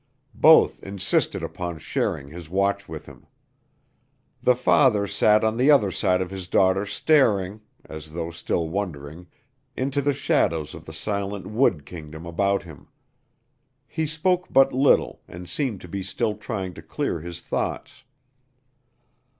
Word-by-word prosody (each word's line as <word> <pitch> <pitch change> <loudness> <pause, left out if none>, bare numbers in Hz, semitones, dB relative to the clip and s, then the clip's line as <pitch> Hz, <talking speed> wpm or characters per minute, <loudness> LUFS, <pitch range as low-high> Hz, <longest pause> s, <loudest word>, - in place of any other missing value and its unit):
Both - - +5
insisted 100 0 -1
upon 85 -2 -5
sharing 70 -2 -2
his 85 0 -10
watch 100 +2 0
with - - -7
him. - - -15 1.1
The 125 - +4
father 125 -4 +3
sat 105 +2 +3
on 110 +1 +1
the 130 +4 +3
other 115 -10 +5
side 95 -1 +1
of 90 - -9
his 95 -2 -6
daughter 95 +2 +2
staring, 105 -9 +2 0.2
as 80 0 -9
though 85 0 -4
still 85 0 -2
wondering, 85 -2 -5 0.5
into 135 +2 0
the 140 0 +1
shadows 80 -9 0
of - - -11
the - - -9
silent 100 +2 -3
wood 105 - +1
kingdom 80 0 -9
about 100 +4 0
him. 80 -4 -13 1.0
He 160 -1 -2
spoke 180 +4 0
but 135 - +5
little 135 +2 +2
and 90 +1 -10
seemed 115 - -2
to - - -10
be 100 +3 -4
still 105 +4 -1
trying 100 -4 -5
to - - -11
clear 85 - -3
his 85 +1 -7
thoughts. - - -4
95 Hz, 145 wpm, -24 LUFS, 85-110 Hz, 1.1 s, Both